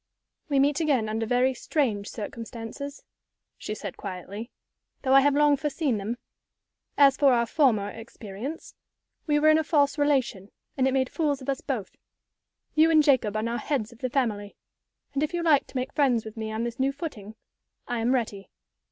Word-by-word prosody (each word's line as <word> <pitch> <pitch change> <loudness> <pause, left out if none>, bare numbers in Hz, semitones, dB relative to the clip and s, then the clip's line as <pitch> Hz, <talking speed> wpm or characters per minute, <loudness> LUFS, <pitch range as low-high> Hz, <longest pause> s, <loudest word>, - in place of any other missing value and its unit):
"We 280 - +1
meet 280 +2 +3
again 280 -9 +1
under 220 +1 -2
very 250 +2 +2
strange 235 -6 -1
circumstances," 230 +5 -7 0.6
she 215 - -4
said, 200 -3 -7
quietly; 200 +4 -7 0.5
"though 265 -1 +2
I 275 - +8
have 285 0 +3
long 295 0 +5
foreseen 295 -4 -1
them. 220 +5 -4 0.8
As 275 -2 +6
for 275 -3 +5
our 235 -1 +2
former 230 -7 +2
experience, 225 +5 -8 0.5
we 295 -1 +3
were 310 +1 +5
in 310 0 +6
a - - 0
false 290 -1 +2
relation, 265 -9 +1 0.3
and 265 -1 +2
it - - +2
made 260 -1 +1
fools 295 -4 0
of 265 - -7
us 270 - -1
both. 235 -9 -4 0.8
You 315 +1 +5
and 310 -2 +5
Jacob 255 -8 +3
are 215 - -1
now 235 +1 -1
the - - -5
heads 250 -6 -2
of 235 - -16
the 255 - -2
family. 215 -6 -1 0.6
And 280 - -1
if 305 +3 -1
you 345 - -1
like 305 -4 +4
to - - -6
make 255 +1 -3
friends 250 -6 +2
with 220 0 -8
me 220 -1 -4
on 220 +1 -2
this 235 +1 -4
new 270 +1 +2
footing, 260 - -7 0.5
I 240 -1 -2
am 240 +3 +2
ready. 210 -5 -3
255 Hz, 190 wpm, -26 LUFS, 220-285 Hz, 0.8 s, I